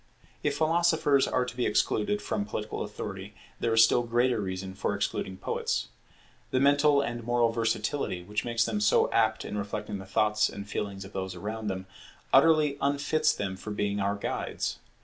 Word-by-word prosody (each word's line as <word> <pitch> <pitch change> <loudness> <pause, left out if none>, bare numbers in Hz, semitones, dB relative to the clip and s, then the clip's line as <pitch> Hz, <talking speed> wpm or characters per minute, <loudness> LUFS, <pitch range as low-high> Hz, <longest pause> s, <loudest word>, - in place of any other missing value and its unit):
If 145 -1 0
philosophers 160 -3 +3
are 125 - +1
to 125 - -7
be 125 - 0
excluded 105 -1 +1
from 105 -2 -1
political 105 +1 -4
authority, - - -6 0.2
there 115 - 0
is 115 0 +7
still 115 - +4
greater 120 0 +1
reason 95 0 -4
for 100 +1 -2
excluding 95 -1 -2
poets. - - -2 0.6
The 130 - +1
mental 145 +1 +4
and 120 -4 -4
moral 120 0 +2
versatility 115 -3 -1
which 105 +3 -3
makes 115 -1 +1
them 105 -3 -1
so 105 - +3
apt 110 -1 +2
in 105 - -3
reflecting 105 0 -4
the 95 - -10
thoughts 105 +1 +2
and 100 0 -8
feelings 100 -1 -4
of 95 - -12
those 95 -1 -4
around 110 +4 -5
them, 95 -1 -3 0.5
utterly 155 -3 +5
unfits 145 +2 +2
them 95 -2 -3
for 95 - -8
being 105 -1 -1
our 100 +1 0
guides. 100 - -3
110 Hz, 175 wpm, -28 LUFS, 100-130 Hz, 0.6 s, is